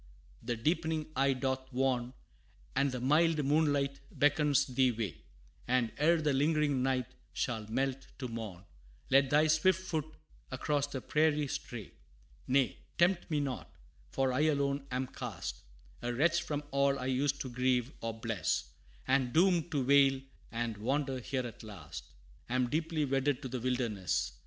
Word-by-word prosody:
The 120 +1 -2
deepening 160 +5 0
eve 135 -1 +2
doth 130 0 -2
warn, 125 -1 0 0.6
And 140 0 +2
the 125 - -3
mild 150 +3 +3
moonlight 145 -2 +2
beckons 145 -1 +3
thee 130 0 +2
away; 110 - -4 0.5
And, 125 -2 +2
ere 165 +3 +4
the 150 -2 +1
lingering 145 -1 +2
night 130 -1 +1 0.3
shall 110 -3 -2
melt 135 +3 -1
to 130 - -4
morn, 110 -6 -6 0.5
Let 135 0 +5
thy 150 +2 +5
swift 160 +4 +3
foot 160 -5 -3 0.4
across 145 -1 0
the 135 -2 -5
prairie 150 0 +2
stray. 120 -6 -6 0.6
Nay, 130 -1 +2 0.2
tempt 175 +1 +2
me 155 -2 +1
not! 135 -3 -5 0.3
for 130 - 0
I 130 - 0
alone 140 -2 0
am 130 +1 -1
cast, 90 - -6 0.4
A 120 - -2
wretch 165 +7 +2
from 150 -1 -3
all 140 0 +2
I 130 - -4
used 140 +2 +1
to 130 - -4
grieve 125 0 +1
or 115 - -2
bless; 110 -5 -2 0.4
And 130 -2 +2
doomed 175 +1 +3
to 145 -6 0
wail 135 0 +5 0.3
and 115 -2 -2
wander 135 +4 -1
here 130 +1 -2
at 115 - -8
last, 80 - -9 0.4
Am 125 -1 +1
deeply 160 -1 0
wedded 135 +1 0
to - - -3
the 125 0 -4
wilderness. 120 -6 -1
135 Hz, 155 wpm, -32 LUFS, 125-150 Hz, 0.6 s, Let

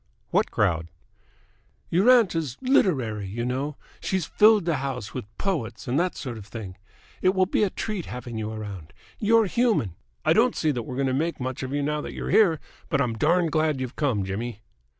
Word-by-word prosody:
"What - - +2
crowd?" 85 0 +1 1.0
"Your 190 +8 +4
aunt 240 -7 +6
is 155 -7 -2
literary, 130 - +2
you 115 +5 -3
know. 135 +4 -2 0.2
She's 190 -4 -1
filled 210 0 +5
the 165 -4 +1
house 130 -5 -4
with - - -4
poets 120 - -3
and 130 +5 +1
that 180 +1 0
sort 125 -5 -5
of 100 - -11
thing. 100 -4 -7 0.5
It 185 +1 +3
will 185 0 +4
be 185 - 0
a 205 - +2
treat 205 -2 -4
having 125 -1 -6
you 110 0 -3
around. 100 -7 -7 0.3
You're 225 +1 +4
human! 210 - +1 0.3
I - - +5
don't - - +3
see 155 - +1
that 125 -4 -2
we're 125 +3 -6
going 135 +1 0
to 130 - +1
make 165 +5 -1
much 130 0 -3
of 130 - -4
you 145 0 0
now 150 +1 -1
that - - -6
you're - - -4
here, 175 -8 +5 0.3
but 140 - +1
I'm 125 -4 +1
darned 165 +7 +2
glad 155 -2 +1
you've 130 -1 -4
come, 125 -10 0
Jimmy!" 110 +3 -4
140 Hz, 205 wpm, -25 LUFS, 115-180 Hz, 1.0 s, aunt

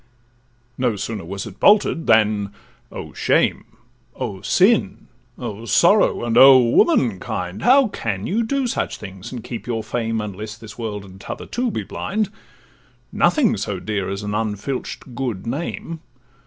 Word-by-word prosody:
No 125 -4 +1
sooner 105 0 -4
was 95 +3 -5
it 105 -3 -11
bolted, 205 -5 +4
than—Oh 105 -2 -1
shame! - - +1 0.5
O 95 -1 -5
sin! 190 - +2 0.3
Oh 115 -2 -6
sorrow! 175 - +4
and 115 -1 -1
oh 135 0 +10
womankind! 115 - +1
How 260 +1 +5
can 105 - -4
you 215 +6 0
do 270 +4 0
such 240 - -2
things 95 -2 -9
and 120 -4 -6
keep 120 -1 -7
your 115 -2 -2
fame, 115 0 -2
Unless 105 +1 -6
this 110 -2 -11
world, 105 -4 -5
and 95 0 -14
t' - - -12
other - - -5
too, 245 0 -2
be 210 - -3
blind? 210 0 -3 0.8
Nothing 265 - +2
so 100 -1 -3
dear 100 -1 -3
as 100 +1 -4
an 105 0 -3
unfilch'd 110 +4 -4
good 120 -7 -4
name! 160 +5 -4
115 Hz, 150 wpm, -21 LUFS, 100-160 Hz, 0.8 s, oh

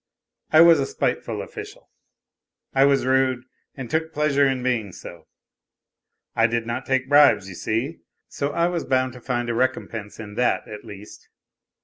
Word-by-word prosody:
I 155 - +6
was 165 -2 +7
a 135 - -1
spiteful - - -2
official. - - -10 0.8
I 135 0 +5
was 140 -2 +2
rude 130 -1 +1 0.3
and 130 -3 -6
took 160 +4 -1
pleasure 145 -2 +2
in 130 -2 -1
being 115 -6 -1
so. 85 -2 -11 1.1
I 115 - +4
did 115 0 -2
not 120 +3 -4
take 130 0 0
bribes, 140 -9 +5
you 95 - -8
see, 115 - -3 0.3
so 140 - -3
I 170 +3 0
was 175 -2 -1
bound 130 -1 0
to 125 - -12
find 120 -1 -2
a 120 - -1
recompense 115 -4 -2
in 105 -2 -8
that, 125 0 +1
at 105 -1 -9
least. 105 -2 -12
130 Hz, 165 wpm, -23 LUFS, 115-140 Hz, 1.1 s, was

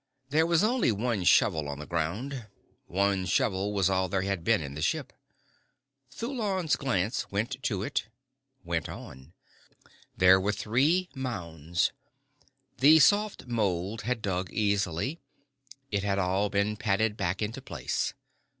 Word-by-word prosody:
There 160 +3 +3
was 170 +2 +3
only 235 - +2
one 110 -1 -1
shovel 85 - +4
on 70 - -5
the 75 - -7
ground. 105 - -3 0.4
One 95 0 +1
shovel 100 0 +1
was 100 -3 +2
all 95 -1 +1
there 95 +1 0
had 95 -3 -2
been 115 +2 +3
in 70 -3 -6
the 75 - -6
ship. - - -1 1.0
Thulon's 205 - -1
glance 110 -4 -1
went 120 +7 -2
to 100 -7 -1
it, - - -2 0.6
went 85 -2 -2
on. 65 +5 -10 0.8
There 95 +1 +6
were 105 +2 0
three 140 - +2
mounds. 85 - -2 0.9
The 150 +4 +8
soft 205 +5 +3
mould 105 -3 -1
had 120 -1 -2
dug 95 -2 -2
easily. 100 - 0 0.7
It 100 -1 0
had 100 0 0
all 100 +2 +1
been 100 +2 0
patted 105 +1 +1
back 95 +1 -1
into 105 +2 -4
place. - - -3
100 Hz, 140 wpm, -28 LUFS, 95-125 Hz, 1.0 s, The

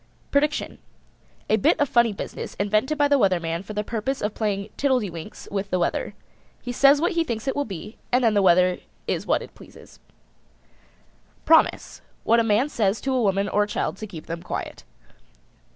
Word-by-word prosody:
PREDICTION. 295 +1 0 0.7
A 215 - +3
bit 200 - +2
of 290 - +3
funny 235 -3 +3
business 200 - -7
invented 215 +9 0
by 290 0 +4
the 285 -1 +3
Weather 190 -5 +3
Man 165 0 -3
for 200 +2 -8
the 210 0 -2
purpose 230 +5 -3
of 210 0 -2
playing 205 -2 -2
tiddledewinks 215 - -2
with 200 0 -3
the 185 - 0
weather. 175 - -1 0.4
He 245 - -6
says 275 +3 +5
what 340 +3 +1
he 335 -1 +1
thinks 235 -4 -5
it 270 - 0
will 285 - -1
be 200 +2 -8
and 250 +1 +3
then 225 -2 +4
the 205 - +3
weather 180 0 +4 0.3
is - - -2
what - - +1
it - - -13
pleases. - - -16 1.5
PROMISE. 320 0 +3 0.2
What 230 +1 +4
a - - +3
man 225 +4 +2
says 220 -7 0
to 270 - -1
a 255 - +1
woman 195 -1 +1
or 205 - +1
a 205 - +1
child 210 - -2
to 215 - -7
keep 170 -6 -10
them 165 0 -5
quiet. 175 - -6
215 Hz, 195 wpm, -24 LUFS, 195-265 Hz, 1.5 s, says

